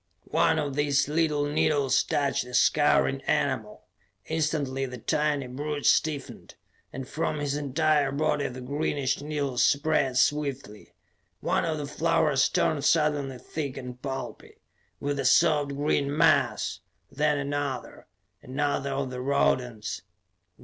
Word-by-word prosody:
One 160 Hz, -1 st, +3 dB
of 145 Hz, -3 st, -2 dB
these 145 Hz, -1 st, +2 dB
little 150 Hz, -1 st, +1 dB
needles 145 Hz, -2 st, +2 dB
touched 140 Hz, -3 st, 0 dB
a 125 Hz, 0 st, -6 dB
scurrying -, -, +3 dB
animal. -, -, -1 dB, 0.4 s
Instantly 150 Hz, -4 st, -1 dB
the 125 Hz, 0 st, -7 dB
tiny 150 Hz, +1 st, 0 dB
brute 145 Hz, +3 st, -4 dB
stiffened, 150 Hz, -4 st, 0 dB, 0.4 s
and 130 Hz, 0 st, -7 dB
from 155 Hz, +1 st, -2 dB
his 145 Hz, -1 st, -2 dB
entire 150 Hz, 0 st, +1 dB
body 145 Hz, 0 st, 0 dB
the 130 Hz, 0 st, -8 dB
greenish 140 Hz, 0 st, -1 dB
needles 145 Hz, -4 st, -1 dB
spread 140 Hz, -3 st, +2 dB
swiftly. 135 Hz, -6 st, -1 dB, 0.4 s
One -, -, 0 dB
of 160 Hz, -2 st, -1 dB
the 145 Hz, -, -4 dB
flowers 150 Hz, -1 st, +2 dB
turned 145 Hz, -3 st, 0 dB
suddenly 150 Hz, -4 st, +1 dB
thick 140 Hz, +1 st, -5 dB
and 125 Hz, -1 st, -8 dB
pulpy 135 Hz, -1 st, -6 dB, 0.4 s
with 145 Hz, 0 st, -2 dB
the 135 Hz, -, -2 dB
soft 145 Hz, 0 st, +3 dB
green 145 Hz, 0 st, 0 dB
mass, -, -, +2 dB, 0.3 s
then 150 Hz, +1 st, +1 dB
another, 140 Hz, -2 st, -4 dB, 0.4 s
another 140 Hz, +1 st, -1 dB
of 135 Hz, -1 st, -2 dB
the 125 Hz, 0 st, -5 dB
rodents 125 Hz, -6 st, 0 dB
145 Hz, 130 wpm, -27 LUFS, 135-150 Hz, 0.4 s, One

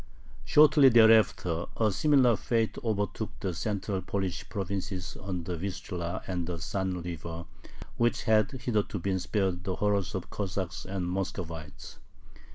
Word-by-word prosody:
Shortly 150 Hz, -2 st, +6 dB
thereafter 110 Hz, -7 st, +4 dB
a 110 Hz, -2 st, +3 dB
similar 130 Hz, 0 st, +4 dB
fate 115 Hz, +1 st, 0 dB
overtook 110 Hz, -1 st, -2 dB
the 95 Hz, -2 st, -2 dB
central 100 Hz, +1 st, -2 dB
Polish 95 Hz, -3 st, -3 dB
provinces 95 Hz, -2 st, -4 dB
on 95 Hz, -3 st, -4 dB
the 90 Hz, +1 st, -3 dB
Vistula 90 Hz, -1 st, -4 dB
and 90 Hz, -3 st, -3 dB
the 90 Hz, -1 st, -3 dB
San 90 Hz, +2 st, -2 dB
River, 85 Hz, 0 st, -6 dB, 0.5 s
which 120 Hz, 0 st, +1 dB
had 110 Hz, -2 st, +3 dB
hitherto 115 Hz, -6 st, -1 dB
been 95 Hz, +1 st, -1 dB
spared 95 Hz, -2 st, -1 dB
the 95 Hz, -1 st, -2 dB
horrors 100 Hz, -3 st, 0 dB
of 95 Hz, -, -2 dB
the -, -, -23 dB
Cossacks 95 Hz, -2 st, -4 dB
and 95 Hz, -2 st, -3 dB
Muscovites. 85 Hz, -7 st, -5 dB
95 Hz, 140 wpm, -29 LUFS, 90-110 Hz, 0.5 s, Shortly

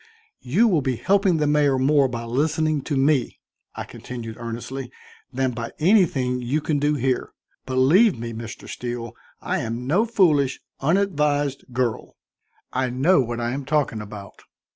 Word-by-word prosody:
"You 180 Hz, -, +3 dB
will 175 Hz, -8 st, +2 dB
be 130 Hz, -1 st, -1 dB
helping 195 Hz, -, +2 dB
the 150 Hz, -, +1 dB
mayor 145 Hz, -2 st, +3 dB
more 140 Hz, +1 st, +3 dB
by 120 Hz, -2 st, -5 dB
listening 150 Hz, +5 st, 0 dB
to 145 Hz, -, -1 dB
me," 140 Hz, 0 st, +2 dB, 0.4 s
I -, -, -4 dB
continued 115 Hz, -3 st, -8 dB
earnestly, 120 Hz, +3 st, -6 dB, 0.4 s
"than 130 Hz, 0 st, 0 dB
by 115 Hz, -1 st, -6 dB
anything 150 Hz, -9 st, +2 dB
you 130 Hz, +5 st, 0 dB
can 150 Hz, -1 st, -1 dB
do 145 Hz, +1 st, +1 dB
here. 130 Hz, -1 st, -1 dB, 0.3 s
Believe 145 Hz, -, +4 dB
me, 115 Hz, 0 st, -5 dB
Mr. 115 Hz, 0 st, -8 dB
Steele, 120 Hz, -2 st, -5 dB, 0.3 s
I -, -, -1 dB
am 115 Hz, +2 st, -4 dB
no 190 Hz, -, +2 dB
foolish, 155 Hz, -, +2 dB, 0.2 s
unadvised 150 Hz, -4 st, +1 dB
girl. 120 Hz, -2 st, -2 dB, 0.6 s
I 130 Hz, 0 st, 0 dB
know 135 Hz, +7 st, +3 dB
what 120 Hz, -1 st, -3 dB
I 120 Hz, 0 st, -1 dB
am 140 Hz, +2 st, -3 dB
talking 135 Hz, -6 st, 0 dB
about." 100 Hz, -1 st, -10 dB
135 Hz, 155 wpm, -23 LUFS, 120-155 Hz, 0.6 s, Believe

